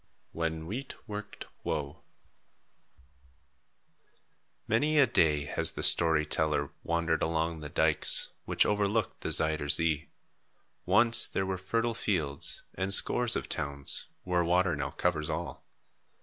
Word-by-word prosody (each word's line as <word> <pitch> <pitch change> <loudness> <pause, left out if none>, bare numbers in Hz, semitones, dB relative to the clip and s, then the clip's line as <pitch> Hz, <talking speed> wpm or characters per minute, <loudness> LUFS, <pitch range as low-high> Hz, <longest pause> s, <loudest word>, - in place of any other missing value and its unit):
WHEN 80 -1 -4
WHEAT 125 +10 -7
WORKED 105 -1 -8 0.2
WOE 70 -1 -4 2.7
Many 150 +8 0
a 145 - +6
day 75 - +1
has - - -2
the - - -6
story 80 -2 +4
teller 75 -2 -2
wandered 85 -1 -1
along 80 0 -2
the 75 -1 -8
dykes, - - +1 0.2
which - - +1
overlook 105 +1 -1
the - - -5
Zuyder 80 -2 +1
Zee. 80 -2 +3 0.8
Once 115 0 +5
there 95 - -3
were 95 -1 -4
fertile 115 +5 -2
fields, 80 -11 +3
and 95 +1 -4
scores 120 +4 +4
of - - -4
towns, 70 -2 -2 0.2
where 90 -1 0
water 90 0 +1
now 75 0 -4
covers 75 +1 -2
all. 85 +2 -6
85 Hz, 125 wpm, -28 LUFS, 75-100 Hz, 2.7 s, a